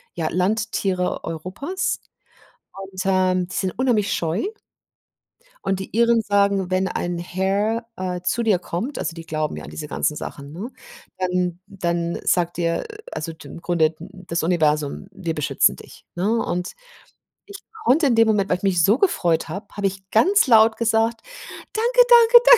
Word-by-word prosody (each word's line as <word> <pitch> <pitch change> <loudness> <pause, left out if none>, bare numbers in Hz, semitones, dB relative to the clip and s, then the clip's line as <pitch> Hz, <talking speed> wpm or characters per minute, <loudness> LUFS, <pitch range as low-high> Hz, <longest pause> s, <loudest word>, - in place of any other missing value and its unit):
ja, 165 -2 -1
Landtiere 190 -1 -1
Europas 185 - -3 0.8
und, 190 -1 -8
ähm, 185 -1 +2
die - - -6
sind 185 -2 -1
unheimlich 235 -6 +2
scheu. 165 +3 -1 1.2
Und 195 -1 0
die 195 - -7
Iren 235 0 +4
sagen, 200 -2 +1
wenn 185 +1 +1
ein 175 -1 -3
Hare, 195 +6 -1
äh, 180 -1 -3
zu 235 +6 0
dir 205 -6 +3
kommt 190 +11 -4
also, - - -2
die 165 0 -9
glauben 155 -1 -2
ja - - -7
an - - -9
diese 150 -1 -7
ganzen 150 +1 -1
Sachen, 140 -1 -7
ne? 215 +10 -6 0.5
Dann 180 -1 -1
dann 170 -3 -2
sagt 175 -1 +1
dir 170 -1 0 0.3
also 165 - -5
d 155 - -13
im 170 - -10
Grunde 160 -2 +1
das 180 -4 -5
Universum: 155 0 +1
„Wir 170 -4 -4
beschützen 150 - +2
dich“, - - -15
ne? 190 +4 0
Und 180 +1 -3 0.7
ich 405 -1 -9 0.3
konnte 285 +3 +4
in 235 - +3
dem 225 0 +5
Moment 205 -3 +1
weil 180 - +2
ich - - -21
mich 180 -4 +2
so 210 +6 +4
gefreut 175 - +1
habe, 200 +1 -6
habe 200 -1 0
ich 195 0 -7
ganz 375 - +4
laut 220 -2 +6
gesagt, 230 0 +1 0.5
danke, 485 +3 +3
danke, 475 0 +8
danke. - - +9
190 Hz, 165 wpm, -22 LUFS, 175-220 Hz, 1.2 s, danke